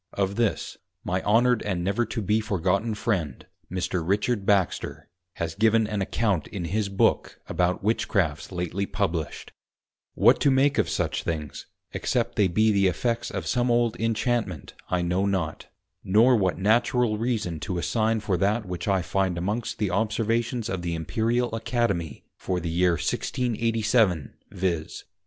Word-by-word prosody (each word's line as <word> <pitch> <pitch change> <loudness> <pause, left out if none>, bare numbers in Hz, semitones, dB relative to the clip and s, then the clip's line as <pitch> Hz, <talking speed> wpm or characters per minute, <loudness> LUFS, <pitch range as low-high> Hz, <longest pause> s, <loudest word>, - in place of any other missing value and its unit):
Of 100 0 -1
this, 115 -2 -1 0.3
my 90 +1 -1
Honoured 120 +3 +3
and 90 -4 -2
never 100 +6 0
to 115 - -3
be 105 +3 +2
forgotten 100 +2 0
Friend 90 - -2 0.3
Mr. 90 -1 -1
Richard 100 +3 0
Baxter, 100 -4 0 0.3
has 80 -1 -3
given 110 +3 +3
an 105 -1 -2
Account 100 -4 0
in 90 -4 -5
his 100 +4 -1
Book 100 - +1
about 90 +1 0
Witchcrafts 95 -8 0
lately 90 +2 -2
Published: 85 -6 -3 0.6
what - - +5
to - - +4
make 135 +2 +3
of - - +1
such - - -1
things, 75 -4 -5 0.2
except 120 -1 -1
they 105 -3 +3
be 110 +5 +3
the 100 -2 +3
effects 115 +6 -1
of - - -4
some 120 0 +1
old 120 -1 +2
Inchantment, 115 - -1 0.2
I 90 -1 0
know 90 +3 +1
not; 95 -5 -2 0.4
nor 110 +6 +5
what 95 -5 +1
Natural 115 +2 +2
Reason 110 -9 -1
to 90 0 -3
assign 110 +4 0
for 95 -4 0
that 105 +5 +1
which 90 +1 -5
I 95 -2 +2
find 95 -1 0
amongst 105 +6 -2
the 105 -3 -1
Observations 115 +3 0
of 95 -5 -3
the 85 -1 -2
Imperial 115 +9 -1
Academy 115 - -2
for 90 -1 -2
the 85 -1 -4
Year 90 +1 +3
1687, 110 - 0 0.2
_viz. 85 -4 -2
100 Hz, 155 wpm, -26 LUFS, 90-115 Hz, 0.6 s, what